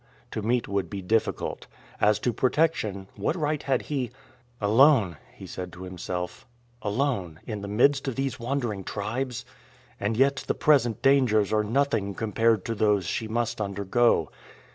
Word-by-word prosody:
To 110 - -3
meet 120 +3 0
would 100 -3 -1
be 100 0 -5
difficult. 110 +4 -1 0.3
As 105 0 +4
to 120 - 0
protection 125 -8 0
what - - -1
right 150 -3 -1
had 130 -3 0
he 135 -5 -2 0.5
"Alone," 110 - +4 0.2
he - - -10
said 90 -1 -6
to 90 +1 -9
himself, 90 -1 -5 0.3
"alone, 105 - -1
in 105 -3 -5
the 100 - -5
midst 135 +7 +3
of 130 - -2
these 135 -1 -2
wandering 120 -5 -2
tribes! 120 +6 -3 0.5
And 105 +2 -1
yet 135 +1 +4
the - - 0
present 130 -8 +3
dangers 125 -7 +4
are 105 0 +3
nothing 105 -4 0
compared 110 -1 +1
to 115 - -1
those 105 -3 +2
she 110 - -2
must 115 0 -1
undergo. 100 -2 +1
110 Hz, 155 wpm, -26 LUFS, 100-130 Hz, 0.5 s, As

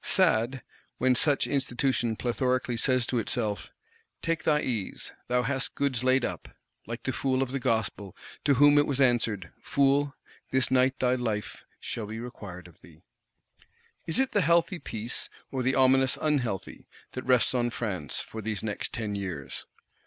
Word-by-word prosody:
Sad, 130 - +2 0.3
when 130 0 +3
such 145 +3 +3
Institution 130 -3 0
plethorically 125 +1 0
says 130 +1 +2
to 120 +1 0
itself, 110 -2 -1 0.5
Take 165 -1 -1
thy 150 -1 +3
ease, 115 -7 -3 0.2
thou 125 0 +2
hast 135 +2 -1
goods 135 -4 0
laid 130 0 +3
up;—like 115 +2 -8
the 130 - -1
fool 130 +1 +1
of 130 - -5
the 135 - -1
Gospel, 110 -5 -1 0.3
to 140 -2 +4
whom 145 +2 +6
it 145 - +3
was 140 -2 0
answered, 115 -8 +2
Fool, 140 +1 +2 0.3
this 130 -1 +1
night 130 +1 +3
thy 125 -1 +2
life 115 -4 -3
shall 110 -3 -5
be 110 +2 -6
required 95 -7 -8
of 85 - -20
thee! - - -18 1.0
Is 165 - 0
it 265 0 +2
the 205 - +2
healthy 170 +2 +3
peace, 115 -2 -3 0.2
or 130 - -1
the 130 +2 +1
ominous 130 0 +4
unhealthy, 130 - -2 0.2
that 130 - -5
rests 125 -2 +3
on 120 -1 +1
France, 100 - -3
for 110 - -7
these 110 -1 -3
next 105 -2 -3
Ten 110 -2 -3
Years? 90 -9 -5
125 Hz, 160 wpm, -28 LUFS, 110-135 Hz, 1.0 s, whom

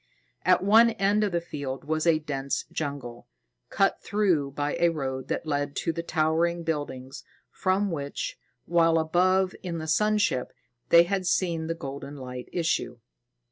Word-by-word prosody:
At - - +4
one 225 +4 +6
end 205 0 +2
of 205 - 0
the 170 - +1
field 145 -5 -6
was 155 +3 -1
a 165 -2 +5
dense 140 -3 -3
jungle, 140 -6 -5 0.4
cut 195 - +1
through 185 -9 +1
by 145 +1 -2
a 170 - +4
road 135 -4 -4
that - - -2
led 145 -2 -2
to 165 - -1
the 170 - -3
towering 165 +1 +1
building 145 -5 -3 0.4
from 190 +1 0
which, 140 -3 -4 0.3
while 165 -1 +3
above 185 +4 +2
in 175 -3 -4
the 160 - -5
sun 210 +7 +2
ship, 130 -11 0 0.4
they 170 0 +8
had 185 +1 -2
seen 170 -4 0
the 165 - -2
golden 140 -1 -7
light 125 -2 -8
issue. 165 -7 -1
160 Hz, 160 wpm, -27 LUFS, 140-180 Hz, 0.4 s, they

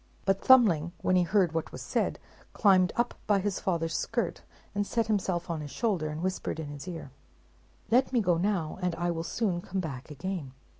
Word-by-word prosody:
But 195 0 +1
Thumbling, 175 -11 +5
when 185 - +3
he 180 - +5
heard 180 0 +2
what 165 0 -3
was - - -7
said, - - 0 0.4
climbed 185 -3 +4
up 240 +1 +1
by 205 -2 +4
his 195 0 -1
father's 165 -3 -1
skirt, 225 +1 -1 0.3
and 205 0 -1
set 230 -1 +1
himself 190 -5 0
on 165 -2 -3
his 145 - -6
shoulder, 185 - -1
and 155 +2 -5
whispered 185 -3 -2
in 155 -2 -5
his 145 +3 -8
ear, 165 -6 -6 0.8
"Let 255 +3 +4
me 250 - +3
go 180 -5 +2
now, 185 -4 -1
and 180 -2 0
I 175 +1 0
will 165 -1 -2
soon 175 +1 -1
come 190 +2 -4
back 140 -7 -5
again." 150 -2 -5
180 Hz, 200 wpm, -29 LUFS, 165-200 Hz, 0.8 s, Thumbling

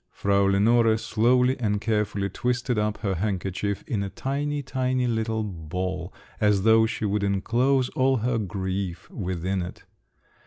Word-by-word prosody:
Frau 100 0 +1
Lenore 110 +3 +4
slowly 125 +4 +2
and 105 -3 0
carefully 105 -2 0
twisted 125 +3 -1
up 105 0 0
her 100 -4 0
handkerchief 95 +1 -2
in 105 - -2
a 100 - -3
tiny, 145 +7 -2
tiny 130 -1 0
little 110 -2 -1
ball, 90 0 -4 0.3
as 105 -3 +3
though 110 0 +5
she 110 - -3
would 105 0 0
enclose 120 +7 +1
all 130 0 +2
her 115 +1 0
grief 95 -3 -3
within 95 0 -2
it. 90 +1 -7
105 Hz, 145 wpm, -25 LUFS, 95-120 Hz, 0.3 s, though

